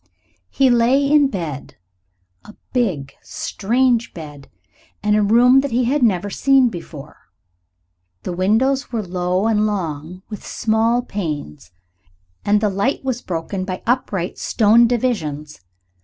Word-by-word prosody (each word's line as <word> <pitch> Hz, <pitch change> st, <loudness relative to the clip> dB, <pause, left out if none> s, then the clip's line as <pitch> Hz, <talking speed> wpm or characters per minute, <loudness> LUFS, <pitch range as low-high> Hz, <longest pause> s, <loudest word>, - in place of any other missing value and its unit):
He 270 Hz, -2 st, +3 dB
lay 245 Hz, +4 st, +3 dB
in 290 Hz, 0 st, +4 dB
bed 165 Hz, -, -6 dB, 0.7 s
a 210 Hz, -, -14 dB, 0.2 s
big, 185 Hz, -, -1 dB
strange 235 Hz, +2 st, -1 dB
bed 145 Hz, -4 st, -10 dB, 0.5 s
in 210 Hz, 0 st, +2 dB
a 210 Hz, -, +3 dB
room 240 Hz, +5 st, +5 dB
that 280 Hz, +1 st, -1 dB
he 245 Hz, +1 st, +1 dB
had 270 Hz, +4 st, 0 dB
never 205 Hz, -4 st, +1 dB
seen 270 Hz, 0 st, +3 dB
before. 165 Hz, -7 st, -10 dB, 1.1 s
The 180 Hz, -, -4 dB
windows 235 Hz, +10 st, +1 dB
were 225 Hz, -3 st, -2 dB
low 180 Hz, +2 st, -1 dB
and 215 Hz, -1 st, +2 dB
long, 175 Hz, -2 st, -4 dB
with 210 Hz, -, -8 dB
small 230 Hz, +2 st, 0 dB
panes, 145 Hz, -, -5 dB, 0.7 s
and 210 Hz, 0 st, +2 dB
the 210 Hz, -, +2 dB
light 200 Hz, +10 st, -1 dB
was 255 Hz, -2 st, -2 dB
broken 185 Hz, +2 st, -4 dB
by 185 Hz, -1 st, -5 dB
upright 205 Hz, -7 st, -1 dB
stone 230 Hz, +2 st, +4 dB
divisions. 160 Hz, -, -2 dB
210 Hz, 130 wpm, -19 LUFS, 180-245 Hz, 1.1 s, room